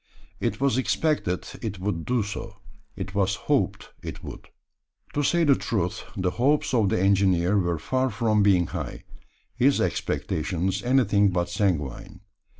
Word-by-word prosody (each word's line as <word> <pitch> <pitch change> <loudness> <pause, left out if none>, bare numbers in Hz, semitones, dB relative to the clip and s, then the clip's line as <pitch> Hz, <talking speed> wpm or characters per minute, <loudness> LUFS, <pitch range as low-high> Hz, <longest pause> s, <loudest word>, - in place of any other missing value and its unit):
It - - -1
was 135 -2 +2
expected 130 - 0 0.2
it 105 -4 -4
would 90 -3 -3
do 125 -3 +1
so 105 +1 -6 0.4
it 95 0 -6
was 100 -1 +1
hoped - - -1
it - - -7
would. - - -9 0.7
To 145 - 0
say 170 +4 +2
the 145 -3 +6
truth, 100 -9 -2
the 90 -1 0
hopes 135 +6 +1
of 110 -5 +3
the 110 - +1
engineer 95 -1 +3
were 85 -4 +1
far 130 - 0
from 110 -1 +1
being 95 -4 +4
high - - -6 0.5
his 135 +3 +3
expectations 90 +4 -1
anything 105 -5 +3
but 90 -1 -1
sanguine. 95 0 -2
100 Hz, 150 wpm, -25 LUFS, 90-125 Hz, 0.7 s, the